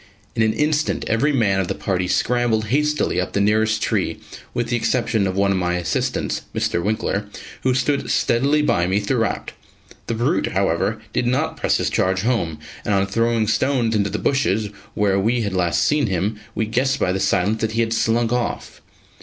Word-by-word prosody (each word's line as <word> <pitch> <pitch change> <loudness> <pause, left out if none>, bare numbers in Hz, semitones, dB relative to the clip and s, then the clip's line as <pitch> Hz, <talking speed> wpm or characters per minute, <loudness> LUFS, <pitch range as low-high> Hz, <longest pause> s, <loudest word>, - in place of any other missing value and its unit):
In 115 - +1
an 110 -1 +3
instant, 150 0 0
every 125 +7 +1
man 105 -8 +2
of 95 - 0
the - - -2
party 90 -2 -1
scrambled 115 -1 +1
hastily 150 -7 +1
up 90 - -5
the - - +1
nearest 110 +2 +2
tree, - - 0 0.3
with 120 -1 -2
the 120 - +1
exception 115 -4 +1
of 95 - -2
one 100 0 +2
of 95 - +1
my 90 -1 0
assistants, 90 -2 -1
Mr. 85 - 0
Winkler, 105 -1 -1 0.3
who 130 -1 +1
stood 140 +2 0
steadily 140 +6 +2
by 85 -11 +2
me 95 +2 +1
throughout. 115 +1 -1 0.6
The 115 - -1
brute, 125 +10 0
however, 95 +3 0
did 120 - 0
not 125 +2 0
press - - +1
his - - -1
charge 95 0 +1
home: 105 -10 0 0.3
and 105 - +1
on 95 0 +2
throwing 115 +2 +1
stones 115 +1 +1
into 100 -2 +1
the - - -2
bushes 110 -6 0 0.3
where 100 -2 +2
we 115 +4 +1
had 100 -3 -2
last 90 -2 +1
seen 150 -4 +2
him, 100 +3 -1 0.2
we 110 - 0
guessed 130 +5 0
by 90 - +1
the 95 - -1
silence 100 +3 +1
that 110 0 -1
he 115 - +1
had 115 0 0
slunk 115 +1 +1
off. 125 -1 -3
110 Hz, 195 wpm, -21 LUFS, 100-120 Hz, 0.6 s, an